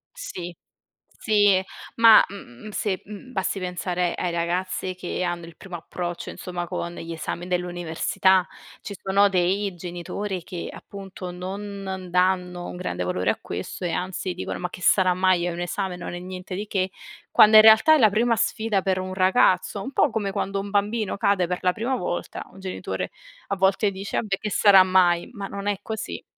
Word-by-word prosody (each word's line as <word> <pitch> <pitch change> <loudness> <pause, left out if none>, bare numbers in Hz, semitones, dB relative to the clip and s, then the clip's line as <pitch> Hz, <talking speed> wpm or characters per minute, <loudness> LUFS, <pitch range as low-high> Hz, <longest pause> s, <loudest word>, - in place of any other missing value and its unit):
Sì, 180 - -7 0.6
sì, 205 -4 +3 0.3
ma, 230 -1 +8
mhmm, 195 - -11
se, 195 -3 -2
mhmm, 210 +5 -10
basti 195 -3 -2
pensare 180 -1 -2
ai 175 - -2
ragazzi 180 +2 -2
che 180 0 -4
hanno 175 -1 -3
il 165 - -13
primo 185 +1 -9
approccio 175 +1 -5
insomma 175 -1 -5
con 170 +1 -4
gli 165 0 -6
esami 170 +2 -5
dell'università. 180 +1 +1 0.4
Ci 200 - -7
sono 200 +1 +3
dei 190 +2 +1
genitori 180 +2 -5
che 175 0 -6
appunto, 190 -2 -9
non 190 0 -6
danno 180 -1 +1
un - - -7
grande 180 - -3
valore 90 +2 -1
a - - -4
questo 90 - -5
e 175 - -1
anzi 185 +1 -3
dicono: 180 - -5
"Ma 180 - -3
che 180 - -11
sarà 185 -1 +4
mai? 185 -1 +2
Hai 175 - -2
un 170 - -5
esame? 180 +1 -3
Non 175 0 -7
è 175 - -5
niente 185 +1 -8
di 205 +3 -4
che." 190 -2 -1 0.4
Quando 215 0 +7
in 215 - +10
realtà 220 +8 +8
è - - +5
la 220 -7 +6
prima 230 +3 +2
sfida 220 -2 0
per 185 0 0
un 185 0 -4
ragazzo, 185 +1 +3
un 265 - -6
po' - - +3
come 205 -3 -2
quando 195 +1 -2
un 200 - -5
bambino 205 +1 0
cade 195 -3 +2
per 180 +1 -2
la 180 -1 +2
prima 240 +4 -1
volta, 175 -5 -4
un 195 - -15
genitore 190 -1 -4 0.4
a 200 - -1
volte 195 +2 +2
dice: 195 +1 -5
"Vabbè 200 -3 -1
che 210 - -4
sarà 195 -2 +7
mai?" 180 -2 +3
Ma 200 -4 -5
non 200 +1 -6
è 205 -2 0
così. 220 -1 -5
185 Hz, 185 wpm, -24 LUFS, 180-200 Hz, 0.6 s, in